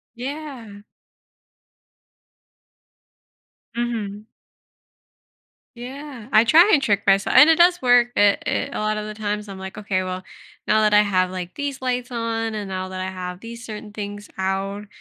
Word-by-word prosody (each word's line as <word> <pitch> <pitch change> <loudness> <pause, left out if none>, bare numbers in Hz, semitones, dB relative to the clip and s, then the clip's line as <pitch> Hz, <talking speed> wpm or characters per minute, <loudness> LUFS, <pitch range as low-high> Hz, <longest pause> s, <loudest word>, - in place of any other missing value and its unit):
Yeah. 250 -6 -7 2.9
Mhm. 220 -3 -3 1.5
Yeah. 255 -1 -9
I 215 +1 +7
try 335 - +6
and 285 - +4
trick 200 -4 +1
mys 195 0 +4
and 300 - +7
it 325 - +6
does 355 +1 +5
work, 245 -2 +5
i 205 -1 +5
i - - +1 0.2
a - - -4
lot 215 0 0
of 210 0 -4
the 215 - -6
times 210 -1 -3
I'm 195 - -8
like, 190 +2 -8
"Okay, 195 -3 -1
well, 185 0 -5 0.4
now 215 0 +3
that 210 -1 +3
I 210 - +7
have, 185 -3 +1
like, 180 -1 -6
these 285 -2 -4
lights 250 -1 -2
on 225 -1 -2
and 210 -2 -4
now 185 0 -4
that 185 0 -6
I 185 0 -3
have 180 -1 -6
these 235 +2 -9
certain 210 -1 -8
things 205 0 -7
out 195 +2 -2
215 Hz, 160 wpm, -22 LUFS, 195-240 Hz, 2.9 s, I